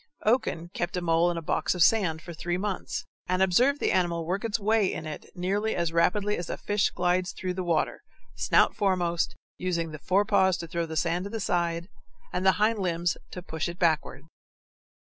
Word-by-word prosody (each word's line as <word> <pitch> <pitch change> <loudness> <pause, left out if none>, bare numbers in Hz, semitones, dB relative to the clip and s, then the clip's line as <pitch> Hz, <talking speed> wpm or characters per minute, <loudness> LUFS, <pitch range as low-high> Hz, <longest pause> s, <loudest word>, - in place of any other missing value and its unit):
Oken 215 -7 +1
kept 175 +1 -2
a - - -1
mole 165 0 +3
in 175 - -2
a 165 - -4
box 155 - 0
of 175 - +4
sand 170 -8 +3
for 170 - -8
three 175 +2 -2
months, 200 0 -3 0.2
and 185 +1 +2
observed 250 +10 +3
the - - +1
animal 170 -2 +1
work 185 +6 -2
its 230 0 0
way 215 -1 +2
in 160 - -5
it 155 - -7
nearly 200 +5 0
as 170 -1 -1
rapidly 205 +5 +2
as 175 - -5
a - - -3
fish 205 0 +1
glides 180 +1 0
through 185 -1 -3
the 185 0 -3
water, 170 -2 0 0.3
snout - - +3
foremost, 180 -4 0 0.2
using 170 -3 -1
the 155 - -8
forepaws 190 +1 +3
to 170 - -6
throw 170 0 -2
the 160 0 -5
sand 175 +3 0
to - - -5
the 225 +1 -4
side 170 -3 -1 0.5
and 180 - -1
the 190 0 +5
hind 215 +1 +2
limbs 175 -2 0
to 180 - -8
push 160 -1 -3
it 170 - -7
backward. 165 -4 0
180 Hz, 205 wpm, -27 LUFS, 170-200 Hz, 0.5 s, the